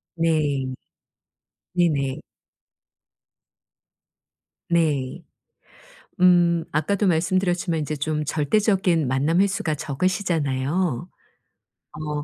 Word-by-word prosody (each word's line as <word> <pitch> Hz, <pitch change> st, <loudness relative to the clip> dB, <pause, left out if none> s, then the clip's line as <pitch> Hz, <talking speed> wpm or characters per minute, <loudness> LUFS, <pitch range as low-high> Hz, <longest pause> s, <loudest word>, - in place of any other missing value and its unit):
네. 155 Hz, -5 st, +1 dB, 1.1 s
네네. 150 Hz, -7 st, 0 dB, 2.5 s
네. 150 Hz, -6 st, 0 dB, 1.0 s
음 175 Hz, -2 st, +4 dB
아까도 195 Hz, +7 st, 0 dB
말씀드렸지만 175 Hz, 0 st, +1 dB
이제 155 Hz, 0 st, -3 dB
좀 150 Hz, +1 st, -2 dB
절대적인 170 Hz, +2 st, +1 dB
만남 140 Hz, +7 st, +1 dB
횟수가 190 Hz, -5 st, 0 dB
적으시잖아요. 155 Hz, -1 st, -1 dB, 0.8 s
어 150 Hz, -1 st, -4 dB
160 Hz, 160 characters per minute, -23 LUFS, 145-180 Hz, 2.5 s, 음